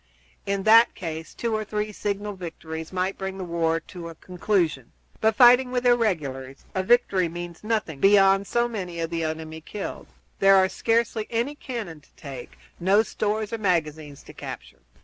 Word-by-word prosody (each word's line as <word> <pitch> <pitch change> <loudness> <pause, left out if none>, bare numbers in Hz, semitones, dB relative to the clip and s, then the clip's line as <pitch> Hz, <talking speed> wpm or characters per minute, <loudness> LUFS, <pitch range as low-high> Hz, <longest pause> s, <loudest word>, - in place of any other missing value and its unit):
In 200 0 -1
that 225 +3 +6
case 160 -2 -6
two 235 -1 -2
or 215 - -1
three 210 0 -3
signal 205 0 -3
victories 160 -3 -7
might 185 +1 -2
bring 190 0 -4
the 190 - -5
war 165 -1 0
to 170 -2 -9
a 165 - -10
conclusion; 175 - -1 0.3
but 220 0 +2
fighting 250 +1 +7
with 250 0 -1
irregulars, 150 - 0
a 190 - 0
victory 190 -4 +3
means 175 +1 -8
nothing 210 -10 -2
beyond 195 +1 +5
so 240 0 +1
many 185 -7 -5
of 165 0 -3
the 165 -1 -2
enemy 160 0 -5
killed. 200 +5 -7 0.3
There 195 0 +6
are 190 0 +5
scarcely 230 0 0
any 235 +5 -1
cannon 230 - -6
to - - -26
take, 135 -3 -9 0.2
no 195 +5 +4
stores 215 0 -2
or 230 - -2
magazines 155 -7 -1
to - - -13
capture. - - -9
190 Hz, 170 wpm, -25 LUFS, 165-215 Hz, 0.3 s, fighting